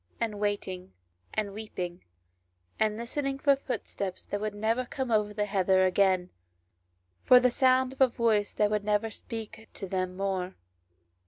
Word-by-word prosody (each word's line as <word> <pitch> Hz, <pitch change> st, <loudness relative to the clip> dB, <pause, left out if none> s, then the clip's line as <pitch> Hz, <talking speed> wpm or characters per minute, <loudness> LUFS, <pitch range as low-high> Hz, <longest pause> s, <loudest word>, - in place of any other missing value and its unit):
[STORY 90 Hz, -, -40 dB
and 210 Hz, -2 st, -7 dB
waiting, 190 Hz, -, -3 dB, 0.4 s
and 205 Hz, -2 st, -1 dB
weeping, 185 Hz, -4 st, -6 dB, 0.8 s
and 215 Hz, -1 st, +1 dB
listening 270 Hz, +4 st, -2 dB
for 280 Hz, +1 st, +3 dB
a -, -, +1 dB
footstep 215 Hz, -7 st, -4 dB
that 205 Hz, -, -5 dB
would 215 Hz, -1 st, -3 dB
never 225 Hz, +4 st, 0 dB
conie 260 Hz, -1 st, -3 dB
over 210 Hz, -1 st, +1 dB
the 210 Hz, 0 st, -1 dB
heather 190 Hz, -2 st, +3 dB
again, 185 Hz, -1 st, +2 dB, 0.9 s
for 250 Hz, -, +8 dB
the 250 Hz, 0 st, +3 dB
sound 260 Hz, 0 st, +3 dB
of 270 Hz, -, -9 dB
a 265 Hz, -, +8 dB
voice 225 Hz, -4 st, +1 dB
that 210 Hz, 0 st, +1 dB
never 210 Hz, +1 st, +1 dB
would 220 Hz, -, -5 dB
speak 225 Hz, 0 st, -7 dB
to 195 Hz, -, -5 dB
them 185 Hz, 0 st, -2 dB
more. 190 Hz, -1 st, -2 dB
210 Hz, 165 wpm, -29 LUFS, 190-235 Hz, 0.9 s, for